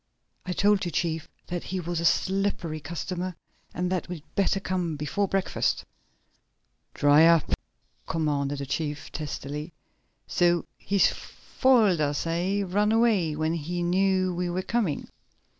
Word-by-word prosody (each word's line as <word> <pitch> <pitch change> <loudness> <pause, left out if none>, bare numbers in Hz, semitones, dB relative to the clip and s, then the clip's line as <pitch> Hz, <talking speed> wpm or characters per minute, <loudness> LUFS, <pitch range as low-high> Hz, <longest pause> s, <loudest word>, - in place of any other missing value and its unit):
"I 180 - -1
told 200 +1 +3
you, 175 - -1
chief, 165 -2 -2 0.2
that 175 -1 -4
he 190 - -3
was 175 -1 -2
a 170 - -1
slippery 190 -3 +1
customer, 175 +3 -4 0.4
and 180 +1 -2
that 185 -1 -2
we'd 170 -5 -6
better 195 0 +2
come 180 -4 -2
before 150 +8 -1
breakfast!" 195 0 0 1.1
"Dry 145 +3 +6
up!" 165 -2 +4 0.6
commanded 145 -3 0
the 140 - -4
chief 145 +1 -3
testily. 150 +1 -5 0.5
"So 175 -1 +2
he's 200 -1 +2
foiled 225 - +2
us, 145 +1 0
eh? 180 +5 0
Run 205 +3 +1
away 220 -9 +3
when 155 +1 0
he 170 +2 -3
knew 185 +1 +2
we 175 0 -2
were 180 +2 -2
coming? 205 -8 -1
175 Hz, 140 wpm, -27 LUFS, 155-190 Hz, 1.1 s, Dry